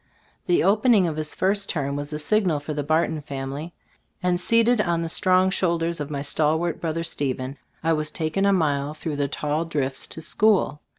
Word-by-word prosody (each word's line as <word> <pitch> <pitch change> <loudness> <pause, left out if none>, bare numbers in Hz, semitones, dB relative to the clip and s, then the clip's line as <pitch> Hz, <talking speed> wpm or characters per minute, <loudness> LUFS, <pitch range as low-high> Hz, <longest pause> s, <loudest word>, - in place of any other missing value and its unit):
The 175 - +3
opening 210 +1 +4
of 160 -3 -2
his 155 -1 -3
first 200 +1 +1
term 140 -4 -1
was 145 +1 -4
a 150 - -3
signal 175 0 +1
for 145 +2 -5
the 145 - -2
Barton 155 +1 0
family, 140 +3 -5 0.5
and 180 0 +1
seated 230 +3 +3
on 170 -4 0
the - - -2
strong 185 +1 +3
shoulders 170 -3 0
of 145 -1 -4
my 140 -2 -3
stalwart 155 +3 +1
brother 165 0 -2
Stephen, 135 -3 -3 0.2
I 165 0 +3
was 155 -1 -1
taken 160 +5 -1
a - - +4
mile 150 -5 0
through 155 -1 -4
the 145 -1 0
tall 150 +2 -2
drifts 140 -5 -2
to - - -9
school. 200 -4 +2
160 Hz, 190 wpm, -24 LUFS, 145-180 Hz, 0.5 s, opening